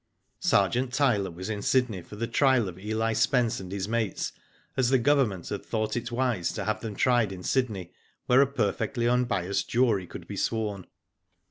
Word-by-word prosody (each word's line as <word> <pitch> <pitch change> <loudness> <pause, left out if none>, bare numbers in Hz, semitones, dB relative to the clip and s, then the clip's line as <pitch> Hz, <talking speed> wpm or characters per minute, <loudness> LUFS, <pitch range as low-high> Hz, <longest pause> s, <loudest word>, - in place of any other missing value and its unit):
Sergeant 125 +1 +2
Tyler 120 -9 +2
was 90 +2 -7
in 105 -2 -3
Sydney 120 -5 +1
for 105 - -12
the 115 +3 -2
trial 130 -1 +3
of 90 0 -8
Eli 110 +3 -1
Spence 115 +1 +2
and 95 -1 -8
his 100 -1 -3
mates, 110 -4 -1 0.4
as 130 -2 +2
the 135 - +5
Government 125 - +2
had 100 - -4
thought 110 -1 -2
it 120 0 -3
wise 120 -7 0
to - - -4
have 110 0 -1
ihem 110 -3 -6
tried 120 -5 +3
in 90 -1 -8
Sydney, 105 -9 -1 0.3
where 125 +2 +5
a 140 - +4
perfectly 120 -1 -1
unbiassed 115 -7 0
jury 115 -7 +2
could - - -9
be - - -7
sworn. 105 -4 -2
115 Hz, 180 wpm, -27 LUFS, 100-125 Hz, 0.4 s, the